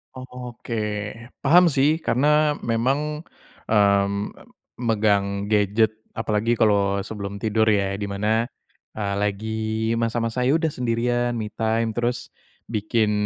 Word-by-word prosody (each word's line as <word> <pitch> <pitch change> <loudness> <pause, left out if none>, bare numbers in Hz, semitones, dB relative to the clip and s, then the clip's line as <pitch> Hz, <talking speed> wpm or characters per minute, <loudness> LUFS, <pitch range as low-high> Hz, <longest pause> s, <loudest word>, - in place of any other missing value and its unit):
Oke, 125 -2 -8 0.7
paham 175 +5 +6
sih. 145 +2 +3
Karena 150 +1 +2
memang 140 +7 -1 0.4
mmm, 100 -1 +2 0.5
megang 100 -3 +1
gadget, 105 +1 +3 0.2
apalagi 110 +1 0
kalau 100 -3 +2
sebelum 100 -2 -6
tidur 110 0 +1
ya, 100 -2 +2
di 100 - -3
mana 105 +3 0 0.5
eee, 100 -2 -2
lagi 105 +2 -2 0.4
masa-masa 115 +1 -1
ya 140 - +4
sudah 160 -1 +1
sendirian, 120 -1 0
me 110 -2 -4
time, 115 0 0
terus 120 +2 -2 0.4
bikin 110 0 0
110 Hz, 115 wpm, -23 LUFS, 105-125 Hz, 0.7 s, paham